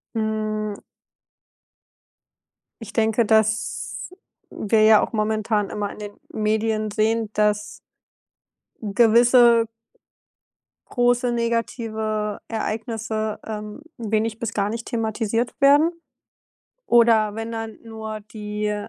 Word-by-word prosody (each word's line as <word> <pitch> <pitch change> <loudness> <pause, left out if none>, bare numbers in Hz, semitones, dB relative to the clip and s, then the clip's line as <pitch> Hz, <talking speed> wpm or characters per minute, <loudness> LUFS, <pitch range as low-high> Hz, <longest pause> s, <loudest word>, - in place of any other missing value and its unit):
Hm. 215 -1 -2 2.0
Ich 220 -2 -9
denke, 225 +1 +2
dass 220 +1 0 0.4
wir 215 +1 +1
ja 215 -1 +7
auch - - -15
momentan 215 -2 0
immer 205 -1 -3
in - - -11
den 205 -1 -6 0.2
Medien 215 0 0
sehen, 220 +1 +1
dass 210 0 0 1.0
gewisse 235 +2 +5 1.2
große 245 0 +2
negative 225 -2 -2
Ereignisse, 220 -1 -3
ähm, 210 +3 -6 0.2
wenig 220 -1 -1
bis 230 -1 -3
gar 200 0 0
nicht 230 +1 -5
thematisiert 225 +1 -1
werden 290 +4 +6 1.0
oder 225 -3 +4
wenn 225 +1 -5
dann 225 -1 -5
nur 220 -1 -6
die 210 -1 -3
220 Hz, 95 wpm, -23 LUFS, 215-230 Hz, 2.0 s, ja